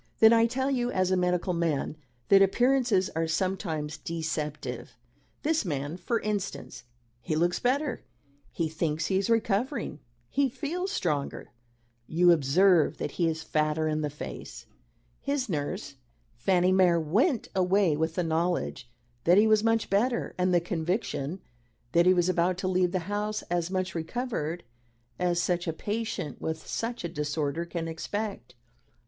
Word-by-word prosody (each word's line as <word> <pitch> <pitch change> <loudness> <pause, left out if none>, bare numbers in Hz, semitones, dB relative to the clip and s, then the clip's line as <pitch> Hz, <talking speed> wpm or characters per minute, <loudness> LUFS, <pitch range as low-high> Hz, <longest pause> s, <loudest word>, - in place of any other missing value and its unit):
Then 220 +1 +7
I 230 0 +5
tell 265 +3 -1
you, 245 -2 0
as 185 -4 +1
a - - +4
medical 180 0 +1
man, 165 -4 -1 0.3
that 195 0 +7
appearances 240 -1 +3
are 165 0 -1
sometimes 160 -3 -2
deceptive. 150 -7 -4 0.5
This 315 -1 +2
man, 145 -3 -3
for 230 +5 -1
instance 205 - -4 0.4
he 155 - -2
looks 175 +3 +1
better; 260 +1 0 0.5
he 165 - -1
thinks 160 0 -1
he 190 +1 +1
is 200 - -2
recovering; 230 - 0 0.3
he 275 - +1
feels 330 +9 -3
stronger. 150 - -2 0.6
You 175 +2 +5
observe 170 +3 +4
that - - -3
he 170 - 0
is 160 -1 -2
fatter 155 +1 0
in 155 0 0
the 150 - -1
face. 150 - -8 0.5
His 280 -2 -1
nurse, 145 -7 -3 0.4
Fanny 180 +9 +2
Mere, 180 -3 +4
went 220 - +1
away 185 -3 +3
with 160 +2 -1
the 180 - +1
knowledge 165 -6 -1 0.4
that 175 +3 +6
he 210 - +6
was 215 -1 +4
much 225 0 +2
better, 235 +5 +1
and 180 0 +1
the 175 - +5
conviction 170 -1 -2 0.5
that 170 +3 +4
he 185 - +7
was 175 -1 +2
about 180 0 +1
to 185 - -2
leave 185 -1 +2
the 185 - 0
house 210 +1 -2
as 175 -1 0
much 185 -1 -2
recovered 170 -2 -3 0.6
as 175 -1 +1
such 175 0 0
a 165 - 0
patient 210 - -4
with 160 0 -4
such 235 -1 -3
a - - -1
disorder 150 0 -2
can 170 -1 -4
expect." 195 - -5
180 Hz, 155 wpm, -28 LUFS, 160-210 Hz, 0.6 s, Then